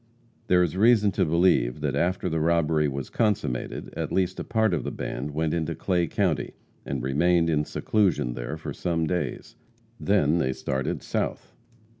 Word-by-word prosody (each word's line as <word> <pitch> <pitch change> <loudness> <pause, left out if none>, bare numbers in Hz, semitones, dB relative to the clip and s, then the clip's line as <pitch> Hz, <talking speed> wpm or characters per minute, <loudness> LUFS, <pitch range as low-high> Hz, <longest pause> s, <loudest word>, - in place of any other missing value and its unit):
There 90 0 +4
is 85 0 -2
reason 105 0 +4
to 95 0 +1
believe 85 -7 +2
that - - -1
after 90 +2 0
the 80 -2 -1
robbery 80 -1 +2
was 70 -1 -5
consummated, 105 - -1
at - - -3
least 95 -1 0
a - - -3
part 110 -4 +1
of 85 - -1
the - - -3
band 70 +4 -4
went 75 +1 -1
into 80 -1 -1
Clay 90 -3 0
county, - - -1 0.3
and 70 -3 -3
remained 85 +5 +2
in 75 -1 +1
seclusion 90 - 0
there - - -5
for - - -6
some 85 -2 -1
days. 80 -6 -3 0.4
Then 85 -5 +2
they 65 -4 0
started 65 0 -3
south. - - -3
85 Hz, 170 wpm, -26 LUFS, 75-90 Hz, 0.4 s, There